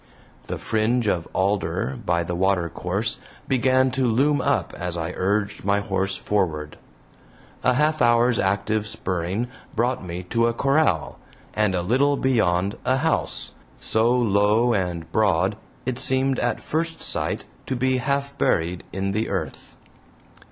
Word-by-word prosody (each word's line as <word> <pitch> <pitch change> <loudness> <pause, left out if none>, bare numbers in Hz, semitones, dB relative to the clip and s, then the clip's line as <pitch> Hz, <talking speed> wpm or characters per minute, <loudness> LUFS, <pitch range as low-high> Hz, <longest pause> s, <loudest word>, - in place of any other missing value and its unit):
The - - -3
fringe 115 +2 0
of 85 -4 0
alder 95 +5 0
by 85 -3 +1
the 85 - -4
watercourse 95 +3 -1 0.3
began 130 0 +3
to 130 0 +1
loom 140 +5 +2
up - - 0
as 90 -1 -4
I 85 +1 -3
urged 100 +2 -1
my 100 +1 +2
horse 95 -1 0
forward. 80 -7 -2 0.8
A 125 - +4
half 155 +2 +2
hour's 120 0 +4
active 100 +2 0
spurring 95 +2 -2 0.3
brought 120 +1 0
me 90 0 -5
to 115 0 +3
a 115 - -1
corral, 135 - +1 0.3
and 105 -2 +1
a 90 - 0
little 140 +8 +2
beyond 105 -6 +1
a 130 +1 +2
house, 160 +4 0 0.3
so 110 +1 +2
low 115 0 +3
and 90 -5 -1
broad 100 -2 +2 0.3
it 130 0 -2
seemed 130 0 +2
at - - -1
first 165 +1 -2
sight - - -1 0.2
to 130 - -1
be 130 +1 +1
half 140 +2 -1
buried 85 +1 +1
in 95 +1 -2
the 110 +3 -1
earth. 90 -6 -5
110 Hz, 145 wpm, -23 LUFS, 95-125 Hz, 0.8 s, A